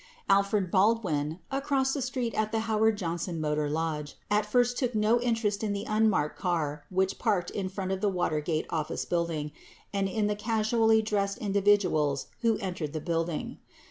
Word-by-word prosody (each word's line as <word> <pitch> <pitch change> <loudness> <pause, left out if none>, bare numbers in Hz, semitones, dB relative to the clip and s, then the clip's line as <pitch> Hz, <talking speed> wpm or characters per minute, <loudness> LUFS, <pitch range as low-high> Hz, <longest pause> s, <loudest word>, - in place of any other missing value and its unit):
9 195 - +6
Alfred 200 -2 0
Baldwin, 185 -7 +2
across 270 -1 +1
the 280 - -2
street 250 -2 -2
at 215 0 0
the 225 0 0
Howard 220 -1 +2
Johnson 170 -2 -3
Motor 150 -1 0
Lodge, 150 -1 -2 0.2
at 210 0 +2
first 245 +2 +2
took 250 -4 -1
no 215 +3 +3
interest 225 -4 0
in 210 -2 0
the 200 +1 -3
unmarked 215 -8 +1
car 150 -5 -1
which 190 +1 0
parked 180 -4 0
in 190 -2 -3
front 190 0 -4
of 190 0 -2
the 210 - +2
Watergate 160 -3 -1
Office 155 -2 -2
Building 165 -4 -1 0.4
and 195 -1 0
in 215 +1 0
the 210 0 0
casually 220 +1 +2
dressed 200 -1 0
individuals 195 - +2 0.2
who 230 -2 +2
entered 175 -6 -4
the 155 - -2
building. 165 0 -2
200 Hz, 175 wpm, -29 LUFS, 165-220 Hz, 0.4 s, 9